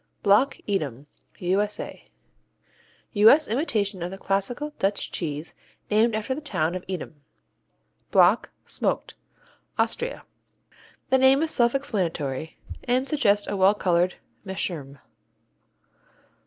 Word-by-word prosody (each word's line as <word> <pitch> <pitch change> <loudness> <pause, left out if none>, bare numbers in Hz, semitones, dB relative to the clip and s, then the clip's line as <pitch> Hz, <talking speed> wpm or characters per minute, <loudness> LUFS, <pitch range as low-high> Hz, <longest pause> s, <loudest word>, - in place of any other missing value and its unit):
Block 210 +8 +4
Edam 145 - -2 0.3
U.S.A. 200 +4 -2 1.1
U.S. 225 +9 +6
imitation 215 - -1
of 175 - -2
the 195 - -8
classical 220 +11 -2
Dutch 195 +1 -1
cheese 155 -1 -4 0.4
named 220 +2 +3
after 215 +4 -2
the 295 - -6
town 170 - -1
of 185 0 -5
Edam. 170 -5 -6 0.9
Block, - - +4 0.2
Smoked - - -1 0.6
Austria 485 +1 -1 0.9
The 265 - +5
name 265 +3 +5
is 320 - -1
self 235 +1 +2
explanatory 165 - -2 0.3
and 255 +2 +1
suggests 210 -10 +2
a 205 - -3
well 195 +2 +4
colored 180 -2 +1 0.3
meerschaum. 170 -8 -4
200 Hz, 110 wpm, -25 LUFS, 175-250 Hz, 1.1 s, U.S